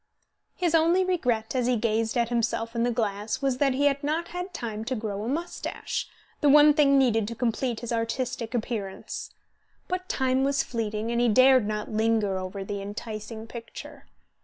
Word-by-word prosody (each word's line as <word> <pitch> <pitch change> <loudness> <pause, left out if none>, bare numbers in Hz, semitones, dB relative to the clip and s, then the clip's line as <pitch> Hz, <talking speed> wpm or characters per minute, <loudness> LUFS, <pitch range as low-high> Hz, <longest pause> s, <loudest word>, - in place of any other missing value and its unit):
His 350 -3 0
only 335 +3 +4
regret, 245 -12 0
as 250 -2 +1
he 250 - +3
gazed 225 +1 0
at 235 -1 +1
himself 230 0 -1
in 230 - 0
the 240 - +2
glass 215 0 -2
was 265 -2 0
that 275 -2 +2
he 285 +2 +1
had 280 0 +2
not 320 +4 -1
had 360 +2 -5
time 220 -6 -5
to 260 +2 -1
grow 210 -3 -4
a 230 - -3
moustache, 335 +6 -3 0.3
the 290 - +3
one 295 +1 +8
thing 280 -2 +4
needed 225 -5 +3
to 230 - -5
complete 240 0 -1
his 240 -1 -3
artistic 230 +1 -2
appearance. 215 -4 -4 0.6
But 365 0 -3
time 260 0 +1
was 280 +1 +2
fleeting, 220 -1 -3
and 235 0 +1
he 240 - +3
dared 255 0 +5
not 210 0 -3
linger 215 -3 +1
over 185 +1 -5
the 200 0 -4
enticing 215 +2 -6
picture. 230 0 -10
235 Hz, 185 wpm, -27 LUFS, 220-275 Hz, 0.6 s, one